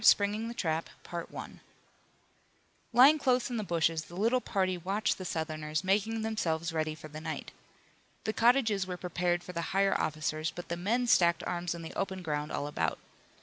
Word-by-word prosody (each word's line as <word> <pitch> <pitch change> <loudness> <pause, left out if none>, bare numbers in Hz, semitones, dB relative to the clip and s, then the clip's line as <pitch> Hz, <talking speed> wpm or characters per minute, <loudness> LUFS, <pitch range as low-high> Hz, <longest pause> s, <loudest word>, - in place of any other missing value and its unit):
SPRINGING 210 +2 +4
THE 235 - -6
TRAP 160 -4 -1 2.0
Lying 265 +6 +7
close 255 -2 +2
in 240 - -1
the 215 - -1
bushes 165 -3 +1
the 175 - -12
little 230 +6 +2
party 185 -4 0
watched 195 +5 -1
the 185 - -5
Southerners 155 -1 -2
making 215 +4 +1
themselves 170 -7 -1
ready 155 -1 -1
for 155 0 -10
the 155 +1 -8
night. 160 -1 -5 0.7
The 220 - -1
cottages 225 -5 +3
were 180 -1 -4
prepared 175 0 -1
for 180 - -8
the 170 - -2 0.2
higher 195 0 +4
officers, 155 +1 -1
but 175 +2 -8
the 170 - -1
men 220 +8 +1
stacked 170 -7 +4
arms 175 -1 -2
in 170 - -7
the 160 - -7
open 190 -1 -3
ground 150 -2 -2
all 145 - -2
about. 85 - -1
180 Hz, 175 wpm, -31 LUFS, 160-215 Hz, 2.0 s, Lying